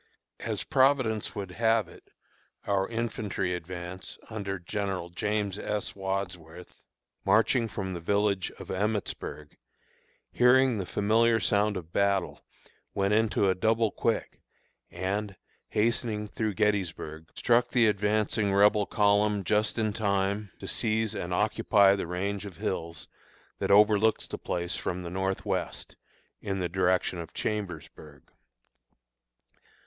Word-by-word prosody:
As - - -3
Providence 130 -5 +2
would 100 -3 -5
have 110 0 +2
it, - - -17 0.6
our 95 -1 +1
infantry 110 -5 -2
advance, 90 +1 -6
under 100 -3 -3
General 95 0 -3
James 105 +1 -1
S. 105 -1 -3
Wadsworth, 90 -3 -5 0.4
marching 115 +2 +3
from 95 -3 -4
the 85 - -4
village 100 +1 +1
of - - -10
Emmitsburg, 95 -7 -3 0.7
hearing 125 -1 +4
the 95 - -4
familiar 115 +3 +3
sound 105 -1 +1
of 85 -2 -9
battle, 100 -2 +1 0.5
went 100 +1 +1
into 110 -2 +2
a 95 - +4
double 110 +3 +1
quick, - - -2 0.5
and, 100 +3 -3 0.3
hastening 110 -1 0
through 105 -1 -2
Gettysburg, 90 -6 -1
struck 120 0 +3
the 120 -2 +4
advancing 105 0 +1
Rebel 105 +1 +4
column 105 -1 +2
just 105 +5 +1
in 110 -2 0
time 100 -1 0
to - - -8
seize 110 -1 0
and 90 -4 -4
occupy 105 0 +4
the 95 - -4
range 100 +3 -3
of 90 -4 -11
hills 85 -1 -4 0.5
that - - -1
overlooks 105 +2 +5
the - - -6
place 85 +1 -2
from 90 0 -3
the 85 - -6
north 95 +1 -2
west, - - -3 0.5
in 100 -2 -2
the 90 -2 -1
direction 90 0 +1
of 85 0 -8
Chambersburg. 85 -8 -5
100 Hz, 125 wpm, -28 LUFS, 95-110 Hz, 0.7 s, overlooks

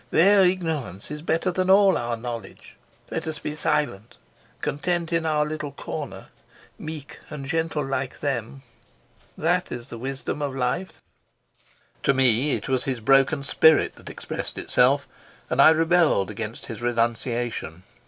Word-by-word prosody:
Their 195 +4 +5
ignorance 160 - -1
is 150 0 -5
better 165 +3 0
than 185 +1 -1
all 195 0 +6
our 120 0 -2
knowledge. 115 -3 -8 0.4
Let - - -3
us 155 -1 -3
be 150 0 -5
silent, 145 -8 -1 0.4
content 170 +3 -1
in 165 -1 +1
our 150 -1 +2
little 150 -1 -4
corner, - - -7 0.5
meek 155 -2 -8
and 140 -2 -6
gentle 160 0 -1
like 135 -1 -3
them. 135 -2 -3 0.7
That 175 +3 0
is 120 -1 -6
the 115 - -7
wisdom 135 +3 -4
of 140 -2 -2
life." 130 +9 -2 1.0
To 140 - +2
me 130 +2 +3
it - - -6
was 130 -2 0
his 130 -3 -2
broken 135 +4 +3
spirit 160 +3 +4
that - - -10
expressed - - -6
itself, - - +2 0.4
and - - +4
I - - +9
rebelled 160 - +3
against 110 +2 -6
his 115 0 -7
renunciation. 120 -6 -1
140 Hz, 145 wpm, -24 LUFS, 120-160 Hz, 1.0 s, I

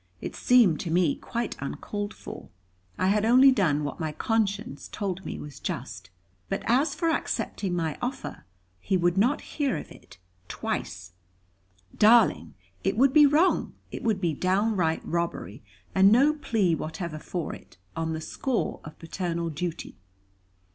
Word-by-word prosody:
It - - -6
seemed 230 -11 +4
to 170 - -4
me 170 -2 +3
quite 235 -1 -4
uncalled 205 +9 -4
for; - - -10 0.5
I 185 - +2
had 210 +1 +2
only 255 +4 +7
done 165 - +2
what 145 - -4
my 160 -2 -2
conscience 215 - -1
told 195 -2 -4
me - - -5
was 150 -1 -9
just. - - -5 0.4
But - - -2
as 260 +7 +2
for 330 -2 +1
accepting 195 - -2
my 160 -3 -2
offer 250 +2 -5 0.3
he 185 - 0
would 175 0 +2
not 245 +9 +2
hear 285 -4 -2
of - - -8
it 105 - -15 0.3
twice. 90 -1 -4 0.8
"Darling, 230 +2 +4 0.3
it - - 0
would 265 +2 +4
be 295 -2 +8
wrong. 310 +6 +2 0.2
It - - -6
would 220 -5 0
be 170 -4 0
downright 185 0 +1
robbery; 165 - -3 0.3
and 195 +1 +6
no 275 +7 +5
plea 225 - +1
whatever 160 0 -4
for 175 +1 -4
it, - - -13 0.2
on 160 0 -2
the 160 - -4
score 255 - -2
of 150 - -11
paternal 170 0 -3
duty. 165 -5 -5
190 Hz, 155 wpm, -27 LUFS, 165-235 Hz, 0.8 s, be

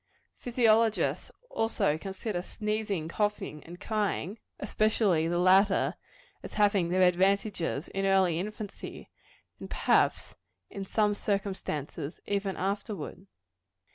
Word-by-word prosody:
Physiologists 230 -2 +2 0.2
also 225 -9 +1
consider 190 +2 -3
sneezing, 210 -4 -2
coughing 205 -5 -2
and 175 +2 -10
crying, 210 -2 -2 0.2
especially 205 -6 +2
the 175 +1 0
latter, 190 +2 +4 0.5
as - - -9
having 200 -4 +3
their 185 +1 +3
advantages, 180 -3 +1
in 195 0 -1
early 190 -4 +3
infancy, 210 +1 -7 0.5
and - - -8
perhaps, - - +2 0.4
in 195 -1 -5
same 210 +1 +2
circumstances, 190 -7 -3
even 200 -1 -1
afterward. 195 -1 -4
195 Hz, 105 wpm, -29 LUFS, 180-210 Hz, 0.5 s, latter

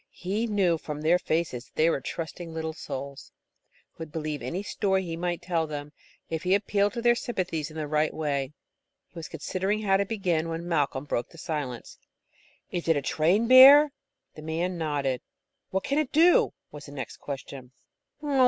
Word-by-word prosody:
He 205 +6 -2
knew 190 -6 +2
from 150 -1 -6
their 170 +3 +3
faces 160 -8 -1
that - - -28
they 160 - +3
were 165 - +1
trusting 165 +4 -6
little 160 0 -3
souls, 140 -3 -7 0.6
who - - -42
would 160 -2 -7
believe 155 -2 -4
any 185 +4 -3
story 190 -2 0
he 165 -2 -4
might 175 0 -3
tell 165 -3 0
them, 145 -1 -6 0.4
if 160 -1 -3
he 185 +2 +3
appealed 205 0 +1
to 235 - -4
their 240 0 +6
sympathies 180 -10 -3
in 155 - -10
the 155 - -2
right 155 +1 +1
way. 140 -3 -2 0.5
He 170 - -11
was 165 - -6
considering 195 +4 -2
how 195 -2 +4
to 200 - 0
begin, 175 -7 0
when 165 +1 -4
Malcolm 145 -4 0
broke 120 -4 -2
the 165 - -16
silence. 150 -8 -5 0.7
"Is 175 - -3
that 165 -2 +3
a 140 - -2
trained 175 - +2
bear?" 275 +4 +9 0.4
The 155 - -11
man 165 +4 -2
nodded. 145 -6 -1 0.5
"What 190 0 -1
can 280 +2 0
it 305 -4 -1
do?" 335 +3 +5 0.2
was 150 -1 -10
the 140 - -10
next 135 -2 -6
question. 135 -2 -8
165 Hz, 185 wpm, -27 LUFS, 150-190 Hz, 0.7 s, bear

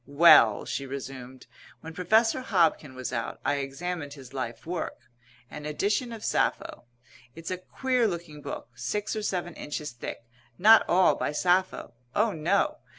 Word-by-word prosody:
"Well," 140 -7 +6
she 140 - -4
resumed, 130 -1 -8 0.4
"when 160 0 -9
Professor 220 +8 +2
Hobkin 165 - +1
was 130 -1 -5
out, 115 - -3
I 145 - +1
examined 145 +2 -4
his 135 -2 -13
life 125 -3 -5
work, 175 +1 -4 0.5
an 150 0 -7
edition 205 - -1
of 225 -2 -7
Sappho. - - -1 0.5
It's 165 +2 -7
a 185 - -3
queer 250 +4 0
looking 170 -5 -6
book, - - -7
six 210 +1 -3
or 215 - -2
seven 180 -4 -3
inches 150 -1 -5
thick, 120 -1 -8 0.3
not 220 +3 +7
all 185 +1 +5
by - - -2
Sappho. 180 -3 0 0.2
Oh, 215 +1 +3
no. 200 - 0
165 Hz, 150 wpm, -27 LUFS, 140-200 Hz, 0.5 s, not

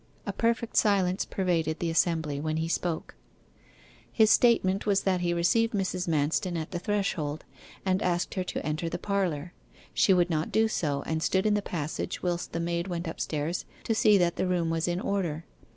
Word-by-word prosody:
A - - -3
perfect 230 0 0
silence 190 -3 +3
pervaded 165 -4 0
the 170 -1 -1
assembly 160 -3 +1
when 155 +1 -2
he 160 +1 -1
spoke. 165 -1 -2 1.0
His 220 -2 +4
statement 215 -5 +3
was 195 -1 +3
that 185 -2 +1
he 175 -1 +1
received 225 +7 +2
Mrs. 185 -2 -1
Manston 165 +4 0
at 160 - -6
the 175 - -3
threshold, 180 -7 -2 0.4
and 190 +1 +1
asked 175 -1 0
her 185 - -1
to - - -4
enter 155 +2 -2
the - - -3
parlour. 180 -5 -2 0.4
She - - +4
would 180 -1 +3
not 155 0 -1
do 220 0 +3
so, 145 -9 -1
and 160 0 -1
stood 190 +4 +1
in 215 - +3
the 210 - +1
passage 160 -6 -4
whilst 175 -1 -2
the 165 - -3
maid 170 +1 -1
went 175 -1 -3
upstairs 160 +1 -3 0.2
to 225 - 0
see 215 -1 +5
that 175 -2 +1
the - - 0
room 175 -2 0
was 165 0 0
in 175 +1 0
order. 170 -6 -2
175 Hz, 190 wpm, -28 LUFS, 160-195 Hz, 1.0 s, see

